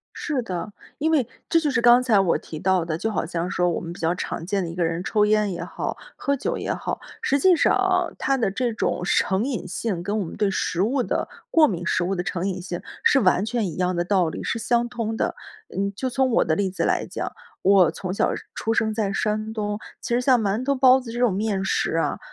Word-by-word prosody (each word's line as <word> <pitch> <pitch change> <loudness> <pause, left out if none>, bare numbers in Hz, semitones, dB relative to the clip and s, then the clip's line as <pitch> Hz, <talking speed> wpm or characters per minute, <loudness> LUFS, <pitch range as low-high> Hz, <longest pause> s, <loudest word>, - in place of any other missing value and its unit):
是 275 -4 -2
的。 190 -1 -5 0.3
因 315 +2 +1
为， 285 -7 +3 0.2
这 330 - +4
就 300 -3 0
是 245 -3 +1
刚 240 +1 +6
才 230 -5 +3
我 180 -3 +2
提 155 - -8
到 185 -1 +2
的， 160 -2 -2
就 220 +4 -1
好 210 - -1
像 170 +1 -3
说 180 -2 +1
我 - - -2
们 170 - -6
比 - - -11
较 165 +1 +1
常 170 -2 -4
见 195 +1 -1
的， 170 - -3
一 165 - -6
个 175 -1 0
人 165 +1 -1
抽 210 +4 +2
烟 210 -1 +2
也 170 -1 -4
好， - - -4 0.2
喝 280 -1 0
酒 - - -2
也 - - -2
好。 - - -4 0.2
实 280 - +2
际 365 +3 +5
上 - - +4
啊， - - +2
他 275 - +1
的 225 -6 0
这 235 +4 -1
种 180 - -1
成 190 +3 +1
瘾 240 -9 -3
性， 185 0 -3
跟 205 +4 -1
我 - - -1
们 165 - -8
对 205 -2 +1
食 185 -1 -1
物 250 +5 +1
的 - - -2 0.2
过 320 -2 +6
敏、 175 - -3
食 180 - +1
物 190 +2 0
的 180 - -2
成 180 +1 -2
瘾 185 -1 -3
性 175 -1 -5 0.2
是 270 - +5
完 185 -1 +3
全 225 -1 -1
一 165 -4 -5
样 180 -1 0
的 175 - 0
道 180 -2 +2
理， - - -5
是 230 - -2
相 240 +1 +1
通 230 -2 -3
的。 - - -1 0.4
嗯， 200 +1 -1
就 260 - -2
从 260 +1 +1
我 - - +3
的 160 - +1
例 195 +1 0
子 185 - -2
来 - - +1
讲， - - -4 0.3
我 190 -2 +5
从 185 -1 -5
小 - - +1 0.2
出 225 0 -1
生 220 -2 +1
在 210 -2 -1
山 215 +2 -1
东， 210 -2 -2 0.2
其 235 - -2
实 245 - +2
像 250 -1 +4
馒 210 +3 0
头、 280 +1 +2
包 260 0 +6
子 245 -3 -9
这 240 - -5
种 245 -5 +3
面 200 -1 -1
食 180 - 0
啊， 165 - 0
205 Hz, 275 characters per minute, -24 LUFS, 180-240 Hz, 0.4 s, 刚